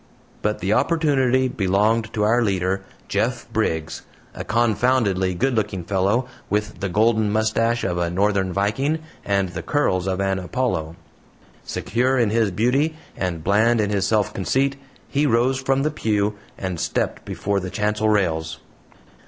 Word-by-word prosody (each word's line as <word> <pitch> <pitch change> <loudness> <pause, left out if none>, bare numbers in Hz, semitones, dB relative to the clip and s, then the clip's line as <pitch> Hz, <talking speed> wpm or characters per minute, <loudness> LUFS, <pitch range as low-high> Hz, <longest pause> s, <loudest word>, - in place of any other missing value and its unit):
But 105 0 -1
the 95 +3 +1
opportunity 135 -4 +2
belonged 110 +2 +1
to 105 - 0
our 115 +3 +3
leader, 95 -3 0 0.3
Jeff - - -1
Briggs 80 0 -1 0.3
a - - -6
confoundedly 110 -4 +1
good 130 +7 +1
looking 105 -5 -1
fellow, 100 +7 +1 0.2
with 105 0 -2
the 100 - -2
golden 110 +2 +2
mustache 115 +2 +1
of 90 -2 -1
a 85 -1 0
northern 95 +1 +1
viking 105 - 0 0.3
and 100 -2 0
the 90 -2 -5
curls 95 - 0
of 95 0 -1
an 95 -1 0
Apollo. 90 -4 -2 0.7
Secure 130 +3 0
in 115 -4 +2
his 110 -2 +2
beauty 125 - +1 0.2
and 85 -4 -3
bland 110 +5 +3
in 105 -1 +1
his 100 -1 +1
self 105 -3 +1
conceit, 135 +8 0 0.3
he 145 +2 +1
rose 125 +2 +2
from 135 +1 +1
the 155 - +1
pew, 105 -6 0 0.2
and 95 -3 -4
stepped - - -2
before 100 0 -2
the 95 0 -5
chancel 105 +1 0
rails. 80 -6 0
105 Hz, 155 wpm, -22 LUFS, 95-120 Hz, 0.7 s, our